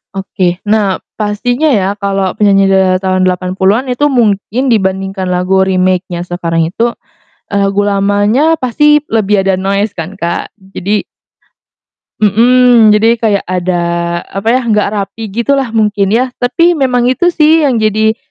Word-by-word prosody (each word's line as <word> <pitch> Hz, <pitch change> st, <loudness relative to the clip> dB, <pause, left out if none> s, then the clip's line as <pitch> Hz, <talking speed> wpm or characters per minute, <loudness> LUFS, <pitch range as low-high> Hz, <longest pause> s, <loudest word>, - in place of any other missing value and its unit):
Oke, 185 Hz, -2 st, -2 dB
nah, 205 Hz, -2 st, 0 dB, 0.2 s
pastinya 245 Hz, +8 st, -1 dB
ya 200 Hz, -9 st, +1 dB
kalau 195 Hz, -2 st, -1 dB
penyanyi 200 Hz, -2 st, +3 dB
di -, -, +3 dB
era 185 Hz, -1 st, +2 dB
tahun 185 Hz, 0 st, 0 dB
80-an 190 Hz, +6 st, 0 dB
itu 290 Hz, +4 st, +1 dB
mungkin 230 Hz, -2 st, 0 dB
dibanding 190 Hz, -3 st, 0 dB, 0.2 s
lagu 180 Hz, +1 st, 0 dB
remake-nya 185 Hz, -1 st, -1 dB
sekarang 170 Hz, -2 st, -2 dB
itu, 235 Hz, +4 st, -1 dB, 0.5 s
eee, 200 Hz, -, -1 dB
lagu 195 Hz, +1 st, 0 dB
lamanya 205 Hz, +8 st, +1 dB
pasti 295 Hz, +4 st, +3 dB
lebih 210 Hz, -2 st, +1 dB
ada 190 Hz, 0 st, 0 dB
noise 200 Hz, +2 st, -2 dB
kan, 165 Hz, +3 st, -6 dB
Kak, 170 Hz, 0 st, -3 dB, 0.2 s
jadi 205 Hz, +3 st, -1 dB, 1.2 s
Mhm, 235 Hz, +2 st, +4 dB
jadi 215 Hz, +2 st, +3 dB
kayak 210 Hz, -3 st, 0 dB
ada 180 Hz, -1 st, -2 dB, 0.4 s
apa 195 Hz, +3 st, -4 dB
ya, 250 Hz, +1 st, +1 dB
gak 210 Hz, -3 st, +1 dB
rapi 210 Hz, +2 st, -5 dB
gitu 235 Hz, +7 st, -1 dB
lah 270 Hz, -3 st, -1 dB
mungkin 210 Hz, -3 st, 0 dB
ya, 245 Hz, +4 st, 0 dB
tapi 335 Hz, +8 st, +2 dB
memang 255 Hz, -5 st, 0 dB
itu 260 Hz, +8 st, +2 dB
sih 320 Hz, -1 st, +3 dB
yang 270 Hz, -6 st, +1 dB
jadi 220 Hz, +1 st, +1 dB
205 Hz, 150 wpm, -12 LUFS, 190-240 Hz, 1.2 s, Mhm